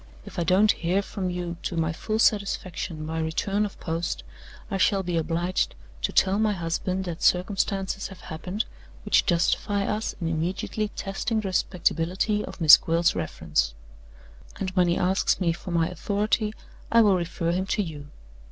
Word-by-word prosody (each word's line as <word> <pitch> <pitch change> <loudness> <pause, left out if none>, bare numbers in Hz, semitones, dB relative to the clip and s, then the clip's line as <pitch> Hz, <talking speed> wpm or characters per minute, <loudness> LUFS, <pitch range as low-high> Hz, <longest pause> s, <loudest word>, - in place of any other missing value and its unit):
If - - -7
I - - +2
don't 190 +5 +5
hear 180 +4 0
from 190 -2 -3
you 175 -1 -4
to 170 - -3
my 160 0 +1
full 215 +6 -2
satisfaction 190 -6 0
by 160 +1 -3
return 195 +6 0
of 205 - -8
post, 165 +1 -3 0.5
I 195 - 0
shall 195 0 +3
be 175 -1 -2
obliged 170 +3 0 0.3
to - - 0
tell 195 +2 +3
my 215 -1 +2
husband 180 +2 -2
that 170 -2 -5
circumstances 195 +1 +1
have 185 -2 -12
happened 180 +6 -4 0.4
which - - +3
justify 200 +3 +1
us 210 +2 -2
in 165 - -2
immediately 175 +6 -1
testing 215 +3 -2
the 195 - -3
respectability 185 +3 0
of - - -9
Miss 155 -3 +10
Gwilt's 165 +1 +1
reference. - - -1 0.8
And 190 -1 -2
when 180 -1 +3
he 170 - +2
asks 190 +2 +2
me 170 -3 +2
for 175 - -9
my 165 -2 +2
authority, 210 +3 -1 0.4
I 230 - +7
will 200 -3 +5
refer 170 -1 -1
him 185 +2 -1
to 205 - +1
you. 150 -5 -8
180 Hz, 170 wpm, -26 LUFS, 165-200 Hz, 0.8 s, Miss